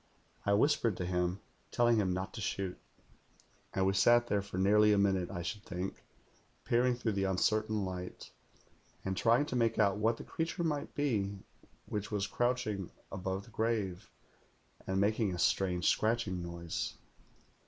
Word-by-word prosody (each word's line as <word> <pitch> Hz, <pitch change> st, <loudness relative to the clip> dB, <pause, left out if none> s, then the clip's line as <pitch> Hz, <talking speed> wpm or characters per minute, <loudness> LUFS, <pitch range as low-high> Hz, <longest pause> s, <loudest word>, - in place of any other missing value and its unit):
I 100 Hz, -, +4 dB
whispered 115 Hz, -2 st, +3 dB
to 90 Hz, -, -2 dB
him, 90 Hz, +1 st, -1 dB, 0.3 s
telling 120 Hz, -1 st, +3 dB
him 95 Hz, -4 st, +2 dB
not 95 Hz, +2 st, -3 dB
to 110 Hz, -, -6 dB
shoot; 100 Hz, -4 st, -2 dB, 1.0 s
and 95 Hz, -, +2 dB
we 95 Hz, -, +3 dB
sat 120 Hz, +4 st, +5 dB
there 105 Hz, -4 st, +1 dB
for 100 Hz, -2 st, -7 dB
nearly 105 Hz, +3 st, +5 dB
a -, -, +3 dB
minute, 95 Hz, -3 st, +2 dB
I 90 Hz, -3 st, -4 dB
should 105 Hz, +5 st, -4 dB
think, 95 Hz, 0 st, -5 dB, 0.6 s
peering 125 Hz, +1 st, +3 dB
through 120 Hz, -2 st, -1 dB
the 100 Hz, -1 st, 0 dB
uncertain 105 Hz, +2 st, +1 dB
light, 90 Hz, -1 st, -6 dB, 0.7 s
and 95 Hz, 0 st, -1 dB
trying 115 Hz, +8 st, +3 dB
to 130 Hz, -, -4 dB
make 115 Hz, -2 st, +2 dB
out 100 Hz, -2 st, +3 dB
what 115 Hz, +2 st, +2 dB
the -, -, -8 dB
creature 165 Hz, +2 st, -3 dB
might 150 Hz, -3 st, -2 dB
be 105 Hz, -9 st, 0 dB, 0.5 s
which 105 Hz, 0 st, -4 dB
was 105 Hz, -2 st, -1 dB
crouching 120 Hz, -7 st, -1 dB, 0.2 s
above 95 Hz, +1 st, -3 dB
the 115 Hz, -, -16 dB
grave 105 Hz, -5 st, -1 dB, 0.8 s
and 95 Hz, 0 st, 0 dB
making 105 Hz, -1 st, +1 dB
a -, -, -6 dB
strange 90 Hz, 0 st, +1 dB
scratching 110 Hz, -5 st, +1 dB
noise. 85 Hz, -1 st, -4 dB
100 Hz, 160 wpm, -33 LUFS, 95-115 Hz, 1.0 s, sat